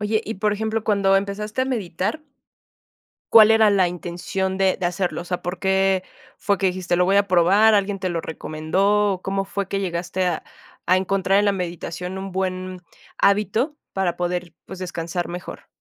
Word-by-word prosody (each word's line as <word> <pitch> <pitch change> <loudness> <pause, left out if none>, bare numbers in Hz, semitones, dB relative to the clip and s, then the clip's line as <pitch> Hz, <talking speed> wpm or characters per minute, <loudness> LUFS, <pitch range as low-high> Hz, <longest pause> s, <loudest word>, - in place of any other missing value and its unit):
Oye, 210 +1 0
y 220 - -4
por 210 +2 0
ejemplo, 220 +1 -2
cuando 200 -2 +2
empezaste 205 +4 -2
a - - +1
meditar. 215 - -2 1.1
¿Cuál 220 -1 +9
era 220 -1 +6
la 190 -3 +3
intención 180 +2 -3
de 190 -1 +2
de 180 - +1
hacerlo?, 180 +1 -2
o - - -7
sea, 180 0 -4
¿por 180 +1 -4
qué 190 0 +2 0.4
fue 200 - +1
que 190 - +1
dijiste 180 -1 -1
lo 180 - +3
voy 195 +2 +3
a 200 -1 +3
probar, 195 +5 +5
alguien 200 0 +1
te 185 -1 -2
lo 170 -2 -2
recomendó, 195 +7 0
o 185 - -10
cómo 195 0 -1
fue 195 0 -4
que 195 - -2
llegaste 180 0 -2
a 175 -3 -1 0.5
a 185 - +6
encontrar 195 +1 +1
en 205 - +3
la 200 - +3
meditación 180 0 -5
un 190 0 -6
buen 185 0 -3 0.4
hábito 210 - +2 0.2
para 190 -3 -1
poder, 175 -1 -3
pues, 190 - -9
descansar 175 -1 -4
mejor? 175 +1 -8
190 Hz, 185 wpm, -22 LUFS, 180-200 Hz, 1.1 s, Cuál